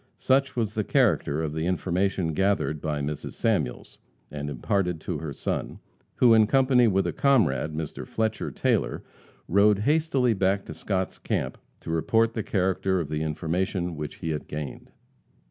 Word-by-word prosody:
Such 135 0 +2
was 110 -4 -1
the 110 - -1
character 75 -5 +2
of 75 -2 -3
the 80 +2 -2
information 90 -1 0
gathered 80 -5 0
by 75 -2 -2
Mrs. 75 +1 -4
Samuels, 60 - -1 0.3
and 75 0 -4
imparted 90 +6 -1
to - - -3
her 80 -3 -5
son, - - -3 0.4
who, 120 -2 +5
in 110 -1 +5
company 130 -1 +4
with 95 -2 +2
a - - -1
comrade, 80 - +2
Mr. 80 -1 -5
Fletcher 110 -1 -1
Taylor, - - 0 0.4
rode 100 +3 +4
hastily 135 0 +2
back 95 0 +1
to - - -7
Scott's 95 -2 -3
camp - - -2 0.2
to - - -5
report 115 +8 +2
the 110 - -2
character 95 -1 0
of 80 -4 -3
the 75 0 -2
information 85 +3 -2
which 75 -1 -5
he 80 - -4
had 75 - -4
gained. 75 -1 -6
95 Hz, 165 wpm, -26 LUFS, 80-110 Hz, 0.4 s, who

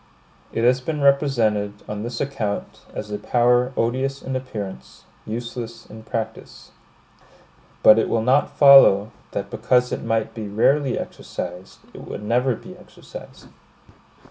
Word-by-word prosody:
It 115 - -2
has 125 +2 +3
been 150 +2 -3
represented, 115 -8 +1
on 105 0 -5
this 120 +2 -5
account, 125 -8 -4
as 105 0 -6
a 105 - -3
power 125 +1 +2
odious 130 +4 -1
in 130 - -4
appearance, 100 - -7 0.2
useless 115 0 -6
in 110 +1 -12
practice. 110 0 -6 1.1
But 110 +1 +8
it - - 0
will 115 -1 0
not 130 +4 +1
follow, 135 -7 +7 0.2
that - - -4
because 125 0 +1
it - - -3
might 115 -1 -1
be 110 -2 -6
rarely 130 +6 +1
exercised, 90 +1 -7
it - - -10
would 105 - -7
never 120 +3 +1
be - - -12
exercised. - - -13
115 Hz, 140 wpm, -22 LUFS, 105-130 Hz, 1.1 s, But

